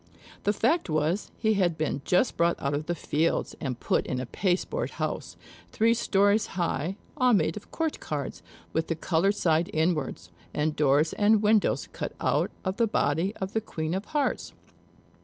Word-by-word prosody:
The 205 - +4
fact 235 - +1
was, 155 +5 0
he 220 -1 +2
had 180 -5 +1
been 150 -3 -1
just 180 +8 +2
brought 170 0 +2
out 140 +1 -1
of 150 +2 -2
the 175 - 0
fields, 160 +1 0
and 130 -5 -3
put - - 0
in 130 - -2
a 130 - -3
pasteboard 190 - -1
house, - - -3 0.3
three 225 +1 +3
stories 205 -1 +2
high, 170 0 -1 0.2
all 250 -3 +4
made 165 -5 +2
of 210 - -9
court 320 -2 -2
cards, 145 -3 -4 0.3
with 160 0 0
the 165 - -1
colored 180 +5 +1
side 165 -3 +2
inwards; 155 - -1 0.2
and 150 +1 0
doors 150 +2 +3
and 210 +1 +3
windows 210 0 +3
cut - - -4
out - - +1 0.2
of 185 +1 -1
the 230 - +3
body 175 +2 0
of 190 +2 -5
the 220 - +1
Queen 160 -6 -3
of 190 +2 -2
Hearts. 295 -2 -1
175 Hz, 175 wpm, -27 LUFS, 155-210 Hz, 0.3 s, The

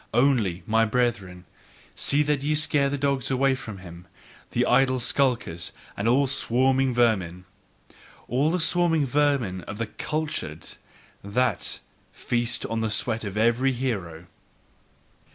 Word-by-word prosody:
Only, 120 -9 +2
my 110 +1 +3
brethren, 110 -6 -1 0.5
see 145 +1 +1
that 150 -2 0
ye 150 +2 0
scare 150 -2 +2
the 145 - -2
dogs 140 -1 0
away 135 +1 +2
from 120 -6 -6
him, 90 -1 -12 0.4
the - - +1
idle 130 -1 +3
skulkers, 120 -10 0 0.2
and 100 - -2
all 130 +4 +4
the 130 - -1
swarming 130 0 +2
vermin: 95 -7 +1 0.8
All 135 +6 +1
the 180 +2 0
swarming 165 -2 +2
vermin 135 -9 +1
of 100 - -7
the 115 - -2
"cultured," 150 - -4 0.5
that 125 +6 0 0.3
feast 120 -1 -1
on 115 0 -2
the 110 - 0
sweat 110 +1 0
of 100 0 -5
every 120 +4 +2
hero! 95 -10 -4
125 Hz, 135 wpm, -25 LUFS, 105-140 Hz, 0.8 s, all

